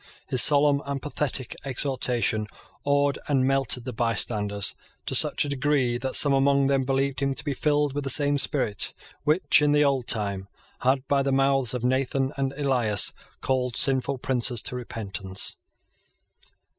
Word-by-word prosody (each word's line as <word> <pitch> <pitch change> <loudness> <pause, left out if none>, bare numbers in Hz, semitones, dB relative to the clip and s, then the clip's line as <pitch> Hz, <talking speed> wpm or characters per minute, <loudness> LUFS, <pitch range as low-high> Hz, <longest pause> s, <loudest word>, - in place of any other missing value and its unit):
His 130 - +4
solemn 145 0 +4
and 140 -1 -3
pathetic 140 -3 -3
exhortation 125 -6 +1 0.4
awed 140 0 0
and 135 -3 +1
melted 135 -3 0
the 125 - -5
bystanders 105 -3 -1 0.3
to - - -3
such - - +3
a - - -5
degree 135 -3 -1
that 130 +1 -3
some 145 -2 +5
among 140 0 +2
them 135 -1 0
believed 135 0 -1
him 140 -1 -1
to - - -6
be 145 - -2
filled 145 0 0
with 145 0 -4
the 135 - -3
same 145 +2 +4
spirit 125 -8 0 0.3
which, 155 +1 +3
in 145 0 +2
the 150 0 +3
old 135 -3 -1
time, 100 -3 -3 0.3
had, 130 +1 0
by 140 -1 +1
the 135 0 -1
mouths 135 -2 +2
of 125 - -5
Nathan 135 +2 -1
and 135 -1 -2
Elias, 125 -8 +1 0.3
called 125 -2 -1
sinful 135 0 +1
princes 125 -3 -1
to - - 0
repentance. 100 -6 -3
135 Hz, 160 wpm, -24 LUFS, 120-140 Hz, 0.4 s, some